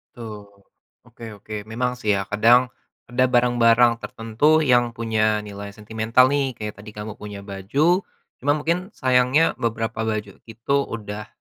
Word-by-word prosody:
Betul. 110 -3 -9 0.6
Oke 115 -2 -11
oke. 105 +1 -8
Memang 125 +3 -1
sih 105 -3 +1
ya 100 - -1
kadang 120 +5 +3 0.4
ada 130 +1 +3
barang-barang 120 -1 +4
tertentu 125 +9 +1
yang 120 -3 +2
punya 110 -2 0
nilai 100 0 -9
sentimental 110 +4 +2
nih. 135 -4 0
Kayak 105 -1 -7
tadi 105 0 -11
kamu 105 0 -7
punya 100 -1 -8
baju, 125 - +1 0.4
cuma 145 +3 +1
mungkin 170 +6 -2
sayangnya 130 +4 +3
beberapa 115 -1 -2
baju 105 -2 -4
itu 115 +5 -2 0.2
udah 105 -1 -7
115 Hz, 140 wpm, -22 LUFS, 105-125 Hz, 0.6 s, barang-barang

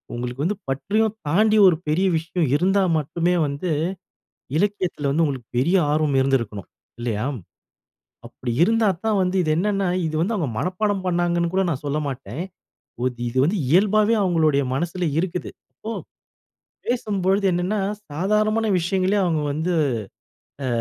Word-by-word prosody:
உங்களுக்கு 125 +3 -4
வந்து 200 +3 -1
பற்றையும் 215 +11 0
தாண்டி 215 +6 +4
ஒரு 180 - +5
பெரிய 180 +6 +2
விஷயம் 165 -1 -1
இருந்தா 190 +5 +3 0.2
மட்டுமே 170 +4 0
வந்து 140 +6 -3 0.9
இலக்கியத்துல 185 -8 0
வந்து 160 +3 +2
உங்களுக்கு 130 -5 -3
பெரிய 170 +9 +3 0.2
ஆர்வம் 150 -2 +1
இருந்துருக்கனும் 115 -7 -1 0.3
இல்லையா? 115 -2 -2 1.0
அப்படி 125 - -6
இருந்தா 225 +2 +2 0.2
தான் 210 -3 +2
வந்து, 180 +1 0
இது 155 - 0
என்னன்னா 195 0 0 0.2
இது 155 - -3
வந்து 225 +5 0
அவங்க 155 -9 -1
மனப்பாடம் 190 +1 -1
பண்ணாங்கன்னு 175 -1 +1
கூட 190 0 +2
நான் 145 -1 -4
சொல்ல 150 +2 -1
மாட்டேன். 130 - -5 0.6
ஒது 125 -2 -2
இது 130 - -5
வந்து 190 +7 +1
இயல்பாவே 210 +6 +4
அவங்களுடைய 160 -6 +2
மனசுல 175 +4 -2
இருக்குது. 180 0 -2 0.2
அப்போ 220 - -8 1.0
பேசும்பொழுது 200 -5 0
என்னன்னா, 180 +4 0 0.3
சாதாரணமான 215 +6 +1
விஷயங்களயே 190 +3 +1
அவங்க 160 -3 +1
வந்து 160 +4 -1 0.9
அ - - -1
175 Hz, 135 wpm, -22 LUFS, 145-200 Hz, 1.0 s, ஒரு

